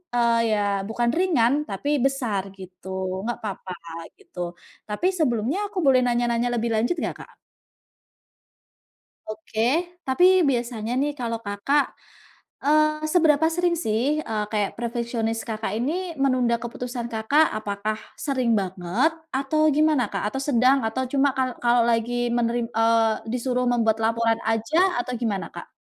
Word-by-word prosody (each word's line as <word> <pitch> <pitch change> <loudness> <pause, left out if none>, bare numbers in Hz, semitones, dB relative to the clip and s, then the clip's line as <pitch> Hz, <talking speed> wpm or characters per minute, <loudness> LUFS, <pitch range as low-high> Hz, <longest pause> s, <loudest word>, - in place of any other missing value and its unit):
eee, 235 -1 +3
ya 210 - +1 0.3
bukan 235 +1 0
ringan, 295 -6 +2
tapi 200 +8 -3 0.2
besar, 230 -8 -1
gitu. 185 0 -5
Gak 240 - -2
apa-apa 195 -3 -5 0.5
gitu. 175 0 -7 0.3
Tapi, 210 +13 0
sebelumnya 280 - 0
aku 410 - -11
boleh 260 -2 +5
nanya-nanya 240 0 +1
lebih 235 +1 -1
lanjut 240 +10 +1
gak, - - -2
Kak? - - -23 1.9
Oke, 215 0 -5 0.5
tapi 265 +7 +3 0.3
biasanya 235 -3 -2
nih 290 +1 0
kalau 230 -2 -2
Kakak 205 +9 +1 0.8
eee, 305 +1 +3
seberapa 320 -3 +4
sering 350 0 +1
sih 255 +4 0
e 225 - -5 0.2
kayak 210 -2 -1
perfeksionis 235 -1 -2
Kakak 220 -3 -3
ini 255 +5 0 0.3
menunda 255 -3 +2
keputusan 240 0 -5
Kakak, 250 +8 +3
apakah 215 0 -3 0.3
sering 260 -5 +1
banget 190 - 0 0.2
atau 295 +4 +2
gimana 305 -3 +3
Kak? - - -3
Atau 270 +5 -3
sedang? 260 0 +4
Atau 260 +4 -2
cuma 280 0 +4
kal 260 -1 +1
kalau 240 0 +4
lagi 230 +1 +1 0.2
meneri 240 0 +1
eee, 225 -1 +3 0.2
disuruh 250 0 -1
membuat 225 -2 +2
laporan 230 0 +1
aja 225 +8 0 0.2
atau 250 +1 -3
gimana 210 -5 -1
Kak? - - -8
235 Hz, 135 wpm, -24 LUFS, 220-270 Hz, 1.9 s, boleh